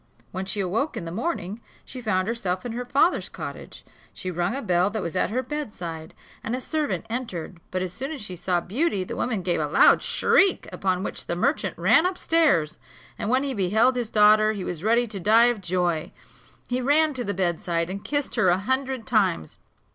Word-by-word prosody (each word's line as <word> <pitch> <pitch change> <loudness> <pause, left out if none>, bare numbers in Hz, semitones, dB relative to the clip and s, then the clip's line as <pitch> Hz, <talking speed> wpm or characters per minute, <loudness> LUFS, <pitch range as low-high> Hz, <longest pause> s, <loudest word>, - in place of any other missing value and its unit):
When 190 +1 -4
she 195 +2 -3
awoke 220 - -1
in 170 - -5
the 165 - -5
morning, 215 - -3 0.2
she 255 - -8
found 185 -4 0
herself 195 -5 -2
in 240 - -3
her 245 +2 -4
father's 290 +8 +2
cottage. - - -8 0.3
She 185 - -5
rung 175 +5 -1
a 275 - -4
bell 180 -1 +2
that 210 -1 -3
was 170 - -5
at - - +1
her 250 +5 -1
bedside, 180 - -6 0.3
and 235 - -2
a - - -3
servant 300 -2 -2
entered; 210 -8 -5
but 185 0 -2
as 180 -1 -5
soon 270 +4 -5
as 305 - -5
she 210 -5 -6
saw 175 0 0
Beauty, 210 - -1
the - - -6
woman 220 -7 -2
gave 175 -1 0
a - - 0
loud - - +5
shriek; 390 -1 +2
upon 185 -1 -1
which - - -5
the 170 - -1
merchant 270 - 0
ran 330 +2 +4
up 365 0 -4
stairs, 295 - +2 0.4
and 210 - -2
when 260 +3 +2
he 275 -1 -2
beheld 220 +5 +2
his 240 -3 -2
daughter 215 0 +5
he 200 -3 -5
was 175 -2 -5
ready 230 +3 +3
to 210 -4 -7
die 220 +5 +5
of 215 - -11
joy. 175 -3 -1 0.6
He 250 +1 -1
ran 300 +4 +3
to 255 -2 -3
the 200 -2 -3
bedside, 170 -2 -1
and 195 +2 -6
kissed 290 -1 -2
her 185 - +3
a 175 - +4
hundred 260 +3 -2
times. 195 - 0
210 Hz, 210 wpm, -25 LUFS, 180-255 Hz, 0.6 s, loud